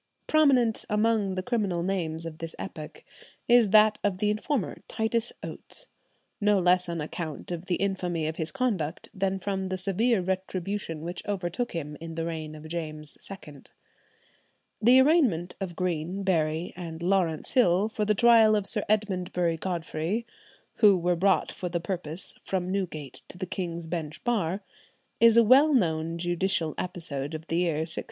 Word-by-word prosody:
Prominent 265 Hz, -8 st, +3 dB
among 210 Hz, -2 st, +1 dB
the 185 Hz, -, -2 dB
criminal 200 Hz, -7 st, -1 dB
names 165 Hz, -4 st, -2 dB
of 160 Hz, -1 st, -7 dB
this 165 Hz, -1 st, -6 dB
epoch 155 Hz, -1 st, -8 dB, 0.4 s
is 240 Hz, -3 st, +6 dB
that 215 Hz, +1 st, +5 dB
of 200 Hz, -3 st, +1 dB
the 210 Hz, +2 st, +1 dB
informer, 215 Hz, +2 st, -2 dB
Titus 225 Hz, +1 st, -1 dB
Oates, -, -, -8 dB, 0.6 s
no 210 Hz, 0 st, +4 dB
less 180 Hz, -1 st, +3 dB
on 170 Hz, -1 st, -3 dB
account 155 Hz, +1 st, -5 dB
of 175 Hz, +1 st, -5 dB
the 180 Hz, -, +1 dB
infamy 180 Hz, -4 st, -1 dB
of 155 Hz, +1 st, -3 dB
his 160 Hz, -1 st, -2 dB
conduct 205 Hz, -, -2 dB
than 195 Hz, 0 st, 0 dB
from 190 Hz, 0 st, -3 dB
the 185 Hz, -, -2 dB
severe 200 Hz, +5 st, +1 dB
retribution 190 Hz, -2 st, -3 dB
which 175 Hz, +2 st, -5 dB
overtook 200 Hz, +4 st, -2 dB
him 150 Hz, -3 st, -5 dB
in 165 Hz, -1 st, -7 dB
the 165 Hz, 0 st, -2 dB
reign 160 Hz, -2 st, -5 dB
of 155 Hz, +1 st, -10 dB
James 155 Hz, -2 st, -4 dB
II. 150 Hz, -8 st, -10 dB, 1.2 s
The 245 Hz, +4 st, +7 dB
arraignment 260 Hz, -, +3 dB
of 180 Hz, -3 st, -4 dB
Green, 180 Hz, +2 st, -2 dB
Berry, 160 Hz, -2 st, 0 dB
and 170 Hz, -2 st, -7 dB
Laurence 175 Hz, -4 st, +1 dB
Hill 200 Hz, -5 st, +4 dB
for 220 Hz, -1 st, -2 dB
the 210 Hz, 0 st, +2 dB
trial 225 Hz, -1 st, +6 dB
of 205 Hz, -2 st, 0 dB
Sir 210 Hz, +1 st, -2 dB
Edmundbury 180 Hz, -5 st, 0 dB
Godfrey, 175 Hz, +4 st, -2 dB, 0.5 s
who 205 Hz, -3 st, +6 dB
were 175 Hz, 0 st, +1 dB
brought 190 Hz, +3 st, +2 dB
for 180 Hz, -, -5 dB
the 170 Hz, 0 st, -1 dB
purpose 170 Hz, -2 st, -4 dB
"from 185 Hz, -1 st, -2 dB
Newgate 155 Hz, -9 st, -4 dB
to -, -, -11 dB
the 185 Hz, -, -3 dB
King's 170 Hz, -2 st, -4 dB
Bench 160 Hz, -2 st, -5 dB
Bar," 200 Hz, -5 st, 0 dB, 0.6 s
is 230 Hz, 0 st, +6 dB
a 235 Hz, -, +8 dB
well 275 Hz, +6 st, +6 dB
known 165 Hz, -6 st, +1 dB
judicial 175 Hz, -1 st, 0 dB
episode 160 Hz, -5 st, -3 dB
of 155 Hz, 0 st, -7 dB
the 165 Hz, -, -1 dB
year 170 Hz, -3 st, +1 dB
1678. 160 Hz, -, 0 dB
180 Hz, 165 wpm, -27 LUFS, 165-210 Hz, 1.2 s, a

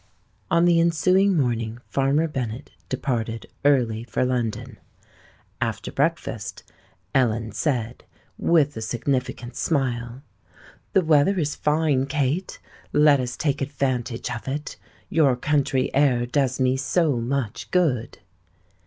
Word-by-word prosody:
On 170 Hz, +1 st, +4 dB
the 170 Hz, -1 st, +4 dB
ensuing 185 Hz, +3 st, +3 dB
morning 115 Hz, -4 st, -1 dB
Farmer 140 Hz, +4 st, +1 dB
Bennet 125 Hz, -5 st, -5 dB, 0.2 s
departed 115 Hz, -4 st, -2 dB, 0.2 s
early 120 Hz, -6 st, +2 dB
for 120 Hz, +2 st, -1 dB
London. 120 Hz, -4 st, -2 dB, 0.8 s
After -, -, -2 dB
breakfast, 120 Hz, -, -2 dB, 0.5 s
Ellen 115 Hz, -4 st, +1 dB
said, 120 Hz, -1 st, -2 dB, 0.3 s
with 150 Hz, -4 st, +2 dB
a 110 Hz, -, -5 dB
significant 125 Hz, +1 st, -2 dB
smile: 125 Hz, -4 st, -1 dB, 0.7 s
"The 190 Hz, -3 st, +3 dB
weather 155 Hz, +5 st, +4 dB
is 150 Hz, -4 st, -1 dB
fine, 150 Hz, -3 st, +1 dB
Kate: 145 Hz, +5 st, -1 dB, 0.3 s
let 150 Hz, -1 st, +5 dB
us 125 Hz, -1 st, -3 dB
take 145 Hz, -2 st, -1 dB
advantage 130 Hz, -4 st, -2 dB
of 120 Hz, +1 st, -6 dB
it. 145 Hz, +3 st, -4 dB, 0.3 s
Your 145 Hz, -6 st, +3 dB
country 135 Hz, 0 st, 0 dB
air 130 Hz, -4 st, +3 dB
does 130 Hz, 0 st, 0 dB
me 130 Hz, 0 st, +2 dB
so 145 Hz, 0 st, +1 dB
much 120 Hz, -1 st, -3 dB
good." 135 Hz, -10 st, +1 dB
135 Hz, 120 wpm, -24 LUFS, 120-150 Hz, 0.8 s, let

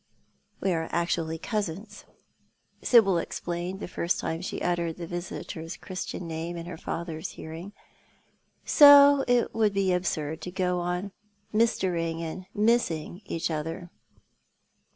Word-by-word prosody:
" -, -, -41 dB
We 195 Hz, -, +2 dB
are 160 Hz, -1 st, -2 dB
actually 165 Hz, -1 st, -1 dB
cousins," 205 Hz, +1 st, -4 dB, 0.8 s
Sibyl 195 Hz, -8 st, +5 dB
explained, 175 Hz, +3 st, -4 dB
the -, -, -5 dB
first 175 Hz, 0 st, -1 dB
time 165 Hz, +1 st, -3 dB
she 185 Hz, -, -4 dB
uttered 170 Hz, -2 st, -1 dB
the 175 Hz, -, -5 dB
visitor's 170 Hz, -1 st, -6 dB
Christian 185 Hz, -2 st, -6 dB
name 165 Hz, +1 st, -4 dB
in 170 Hz, -, -6 dB
her 175 Hz, -1 st, -6 dB
father's 165 Hz, +1 st, -5 dB
hearing, 165 Hz, +5 st, -8 dB, 0.9 s
"so 285 Hz, -1 st, +8 dB
it 245 Hz, -1 st, +2 dB
would 215 Hz, -3 st, +2 dB
be 195 Hz, -2 st, +2 dB
absurd 160 Hz, -4 st, -2 dB
to -, -, -5 dB
go 180 Hz, -1 st, 0 dB
on 180 Hz, +3 st, -2 dB, 0.4 s
mistering 180 Hz, -7 st, +1 dB
and 180 Hz, +3 st, -6 dB
missing 205 Hz, -6 st, +1 dB
each 165 Hz, 0 st, -2 dB
other." 165 Hz, +3 st, -4 dB
175 Hz, 130 wpm, -27 LUFS, 165-195 Hz, 0.9 s, so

